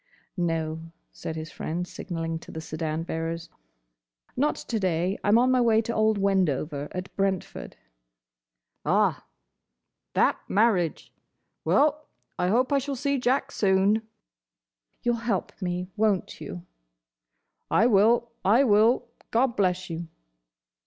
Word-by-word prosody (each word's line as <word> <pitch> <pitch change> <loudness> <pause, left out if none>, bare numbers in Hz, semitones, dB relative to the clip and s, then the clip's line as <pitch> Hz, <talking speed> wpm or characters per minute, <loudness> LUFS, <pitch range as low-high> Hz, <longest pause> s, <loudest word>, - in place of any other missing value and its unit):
"No," 165 -3 -1 0.3
said 160 - -6
his 155 0 -6
friend, 175 +3 -4
signalling 165 -3 -4
to - - -12
the 160 - -6
sedan 155 0 -3
bearers. 165 0 -4 0.9
"Not 290 +4 +1
to 225 - -3
day. 185 0 0
I'm 205 +2 +5
on 250 +2 +4
my 255 -1 +4
way 225 -2 +4
to 235 - -3
old 215 -1 +2
Wendover, 165 -7 0
at 185 +1 -6
Brentford." 195 -2 -2 1.1
"Ah! - - +2 0.9
That - - +3
marriage! 195 -6 +1 0.5
Well, 300 +1 +2 0.3
I 180 - +2
hope 250 +8 +2
I 280 - +4
shall 275 +1 -3
see 280 +1 0
Jack 255 +2 +1
soon." 195 +2 +3 1.0
"You'll 240 0 +2
help 225 -5 -2
me, 180 0 -3
won't 210 -3 0
you?" 175 0 -7 1.0
"I 220 - +4
will. 235 +2 +4
I 225 +8 +5
will. 225 +1 +4 0.2
God 240 +1 +2
bless 185 -2 +1
you." 165 0 -5
195 Hz, 125 wpm, -26 LUFS, 170-235 Hz, 1.1 s, I'm